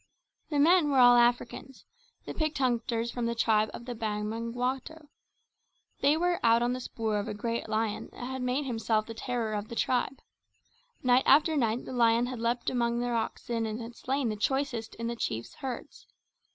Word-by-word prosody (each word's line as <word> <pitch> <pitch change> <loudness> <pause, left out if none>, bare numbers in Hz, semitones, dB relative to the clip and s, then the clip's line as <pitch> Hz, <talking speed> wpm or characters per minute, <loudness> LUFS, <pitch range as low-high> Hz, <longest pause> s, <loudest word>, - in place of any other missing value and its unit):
The 295 - -1
men 320 +1 +5
were 275 - +2
all 245 -1 +8
Africans, 240 +2 +1 0.4
the - - -5
picked 310 -2 -1
hunters 235 -2 0
from 240 -2 -2
the 235 - -1
tribe 220 -2 +2
of 235 - -9
the 245 - -4
Bamangwato. 235 +7 -3 0.9
They 285 +3 +3
were 350 +1 +1
out 230 +1 +5
on 245 +1 +1
the 255 - -3
spoor 220 -4 -2
of 205 - -4
a - - -4
great 230 +2 -3
lion 215 -1 -1
that 245 - -8
had 260 0 -4
made 250 +3 0
himself 225 -3 0
the 225 - -7
terror 230 -2 -3
of 210 0 -3
the 235 - -7
tribe. 255 +3 0 0.9
Night 250 0 +4
after 310 +3 +5
night 235 -3 0
the - - -7
lion 235 -1 +3
had 250 -1 -5
leapt 235 +1 0
among 235 -2 0
their 245 0 -1
oxen 230 0 -2
and 215 +1 -4
had 235 0 -8
slain 265 -1 -1
the 215 - -2
choicest 240 0 -1
in 230 - -5
the 235 +1 -2
chief's 115 - -4
herds. 260 -3 -7
240 Hz, 190 wpm, -29 LUFS, 225-260 Hz, 0.9 s, all